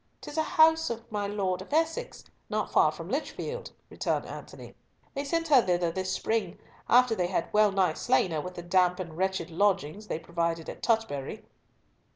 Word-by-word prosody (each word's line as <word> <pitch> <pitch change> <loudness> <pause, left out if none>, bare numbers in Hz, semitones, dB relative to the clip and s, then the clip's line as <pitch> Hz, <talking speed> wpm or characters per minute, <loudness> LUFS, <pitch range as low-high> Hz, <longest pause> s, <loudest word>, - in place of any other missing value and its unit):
"'Tis 295 - -9
a 320 - +2
house 320 +1 +4
of 230 -1 -4
my 205 -1 -1
Lord 195 -3 -1
of - - -11
Essex, 325 +2 -1 0.3
not - - -2
far - - +5
from - - -8
Lichfield," 485 +2 -4 0.2
returned - - -1
Antony. - - -10 0.4
"They 280 - -3
sent 330 +3 -1
her 275 -4 +7
thither 175 -4 +1
this 185 +2 -3
spring, 205 -5 -1 0.3
after 245 -1 +5
they 180 -5 0
had 185 - -2
well 210 -1 +5
nigh 190 -4 +2
slain 190 -2 +2
her 155 -2 -1
with 180 +3 -7
the 175 - -7
damp 180 +1 +2
and 170 -4 -6
wretched 190 -2 -1
lodgings 195 +1 0
they - - -2
provided 170 0 -2
at - - -8
Tutbury." 220 - -1
195 Hz, 185 wpm, -28 LUFS, 175-245 Hz, 0.4 s, her